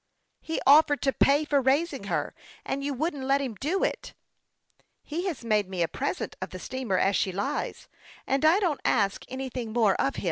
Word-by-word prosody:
" - - -49
He 320 - -3
offered 290 +1 +6
to 270 -1 +2
pay 285 +2 +3
for 285 -2 +2
raising 285 +7 +1
her, - - -2 0.3
and 275 - -3
you 285 -1 -2
Vvouldn't 285 -1 -2
let 275 +1 +3
him 265 -4 -3
do 310 - -1
it! - - -3 0.3
" - - -46
" - - -41
He 345 +5 -3
has 310 -10 -4
made 210 -4 +1
me 185 -2 -1
a - - +1
present 180 - -3
of 185 - -4
the 185 - -8
steamer 245 -1 -2
as 195 +2 +2
she 190 - +1
lies; 200 +10 -3 0.4
and 270 +1 0
I 320 +5 +5
don't 340 -8 0
ask 200 -4 +1
anything 255 -3 -5
more 220 -4 +3
of - - 0
him. - - -4
270 Hz, 215 wpm, -27 LUFS, 215-295 Hz, 0.4 s, offered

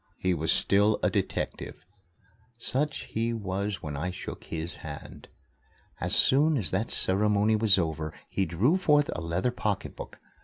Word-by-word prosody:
He 95 -1 0
was 80 -1 0
still 105 +2 +3
a - - +2
detective. 80 - -3 0.7
Such 145 +5 -1
he 115 +1 -2
was 100 -1 -3
when 75 -2 -5
I 80 +6 -2
shook 90 - -8
his 80 +1 -5
hand. 75 -2 -9 0.7
As - - +3
soon 150 +3 +4
as 105 - +1
that 110 +5 -1
ceremony 105 +2 +3
was 110 -3 +4
over, 80 -3 -2 0.2
he 95 - -1
drew 105 - +2
forth 150 -5 +3
a - - -5
leather 85 +9 -1
pocketbook. 105 -5 -4
100 Hz, 150 wpm, -28 LUFS, 85-115 Hz, 0.7 s, soon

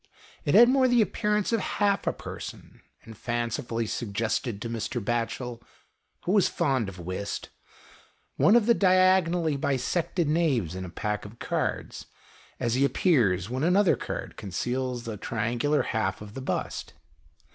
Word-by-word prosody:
It 145 - +2
had 235 +3 +9
more 260 0 +4
the 245 -2 +5
appearance 210 0 0
of 230 - +3
half 200 0 0
a - - +4
person, - - -9 0.2
and 110 - -11
fancifully 120 0 -2
suggested 110 +1 -2
to 115 - -4
Mr. 115 +2 -3
Batchel, 120 +2 -2 0.6
who 180 - -1
was 200 -1 +4
fond 135 - 0
of 95 - -11
whist, 90 +3 -5 0.9
one 205 - +5
of 235 -3 +5
the 235 - +5
diagonally 185 -5 +3
bisected 145 +5 0
knaves 145 - +1
in 95 0 -5
a - - -7
pack 105 +5 -3
of 105 +3 -11
cards, - - -3 0.5
as 115 - 0
he 130 +3 +2
appears 115 - +2
when 130 +3 -3
another 180 +4 +4
card - - -6
conceals 125 +5 -3
a 110 -2 -4
triangular 120 +8 0
half 95 -4 -1
of 105 0 -10
the 135 - -6
bust. 130 - -3
125 Hz, 150 wpm, -27 LUFS, 110-180 Hz, 0.9 s, had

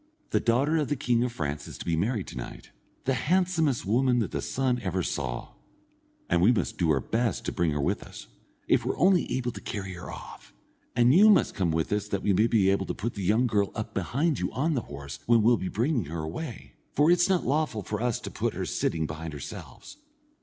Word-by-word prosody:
"The - - +3
daughter 135 +7 +2
of 150 -3 0
the 145 - 0
king 125 -3 +1
of 125 - -1
France 75 -8 -4
is - - -9
to - - -8
be 85 - +1
married 100 +4 0
to - - -10
night, - - -8 0.3
the 135 - +2
handsomest 165 - +1
woman 125 +5 +2
that 115 -5 0
the - - -2
sun 130 -2 0
ever 95 -3 -1
saw, - - -3 0.8
and 85 0 +2
we 105 +7 +6
must 120 - -1
do 85 -3 +2
our 75 -3 +3
best 115 - -1
to - - -1
bring 85 -2 +1
her 75 -1 -1
with 70 - 0
us, - - -10 0.4
if - - +3
we're - - -2
only 185 -1 +3
able 125 -1 -2
to 105 - -9
carry 95 -3 -5
her 90 0 -8
off; - - -11 0.4
and 120 +1 +5
you 205 +6 +7
must 210 - +4
come 90 -3 0
with 80 +4 0
us 105 0 -1
that 100 -2 -2
we 100 - +3
may 105 +5 +4
be 100 -5 +3
able 100 - 0
to - - -3
put 115 +3 -3
the 100 - -6
young 110 +7 +3
girl 105 -4 +1
up 110 - -5
behind 135 - 0
you 90 - -2
on 150 +7 +1
the 130 - 0
horse, 70 - -8
when 115 -2 +5
we'll 120 +2 +5
be 95 - -3
bringing 120 - 0
her 80 +2 -4
away, 115 - -6 0.2
for 150 +4 +5
it's 175 +1 +4
not 185 -2 +2
lawful 140 -6 0
for 105 +2 -4
us 120 -2 0
to - - -6
put - - -2
her - - -2
sitting 80 -1 -1
behind 80 +1 -6
ourselves. 70 - -9
110 Hz, 235 wpm, -27 LUFS, 90-130 Hz, 0.8 s, you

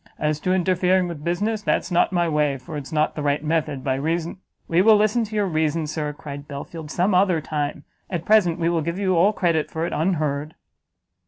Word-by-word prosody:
As 150 0 -1
to 185 - -1
interfering 185 0 +2
with 165 -4 -7
business, 205 +6 -1
that's 195 - -1
not 175 - +3
my 175 -2 +1
way, 150 -3 +1
for 130 +4 -9
it's 145 -2 -6
not 155 -1 +1
the 150 - -5
right 145 0 0
method, 150 -4 -1
by 135 - 0
reason 165 +6 -2 0.2
" - - -45
"We 170 +2 +3
will 220 +2 +7
listen 215 +3 +2
to 215 0 -8
your 205 -1 +2
reason, 160 -2 0
Sir," 150 0 -3
cried 145 -1 -9
Belfield, 150 +2 -7
"some 180 +5 +1
other 180 -2 +3
time; 150 -1 -3 0.3
at 175 -3 -3
present 190 -6 +4
we 165 -1 0
will 170 -1 +1
give 170 +3 -3
you 190 -2 +1
all 180 +5 +4
credit 170 -6 0
for 160 +1 -3
it - - -4
unheard." 155 -3 -1
165 Hz, 220 wpm, -23 LUFS, 150-185 Hz, 0.3 s, will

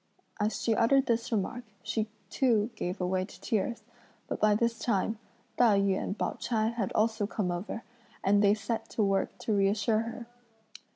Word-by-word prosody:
As 210 +1 0
she 230 - +1
uttered 265 +5 +4
this 230 0 0
remark, 225 +3 -1 0.2
she 220 -1 -1 0.2
too 235 -4 +2
gave 180 +2 -3
way 185 0 0
to 185 - -11
tears, 225 +2 -1 0.4
but - - -3
by 210 -1 +5
this 230 +1 0
time, 220 -1 0 0.4
Tai 225 -5 +5
yü 200 -1 +2
and 200 - -3
Pao - - -2
ch'ai 225 -1 0
had 220 -5 -2
also 220 -1 +1
come 205 -4 -1
over, 185 +6 -4 0.4
and 205 +1 +4
they 205 +1 +5
set 225 +1 -3
to 220 - 0
work 195 -1 0
to 220 - -2
reassure 205 +2 +2
her. 230 +1 -5
215 Hz, 175 wpm, -30 LUFS, 200-230 Hz, 0.4 s, by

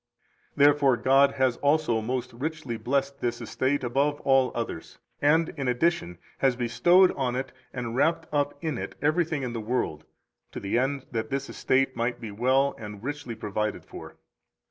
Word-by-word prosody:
208 140 - +5
Therefore 145 -3 +4
God 135 +2 +4
has 130 -2 +1
also 145 -6 +2
most 125 +2 -3
richly 140 -1 -4
blessed 140 +3 -1
this 120 -1 -1
estate 135 +1 -1
above 140 +4 +1
all 135 -2 +3
others, 115 -8 -5 0.2
and, 160 +3 +3
in 140 -4 -4
addition, 125 - 0 0.2
has 135 -2 +3
bestowed 175 +10 +4
on 125 -3 -2
it 130 +1 -3 0.2
and 120 -2 -4
wrapped 160 +4 +2
up 145 -1 0
in 155 -7 -2
it - - -6
everything 155 0 +1
in 125 -2 -3
the 115 - -3
world, 105 -10 -2 0.5
to - - -5
the 100 +2 -2
end 135 +2 0
that 115 +3 -3
this 140 0 -3
estate 135 0 +1
might 120 +1 -1
be 115 -3 -7
well 130 +6 +2
and 105 -1 -8
richly 145 -3 -5
provided 105 0 -3
for. - - -10
130 Hz, 170 wpm, -27 LUFS, 120-145 Hz, 0.5 s, 208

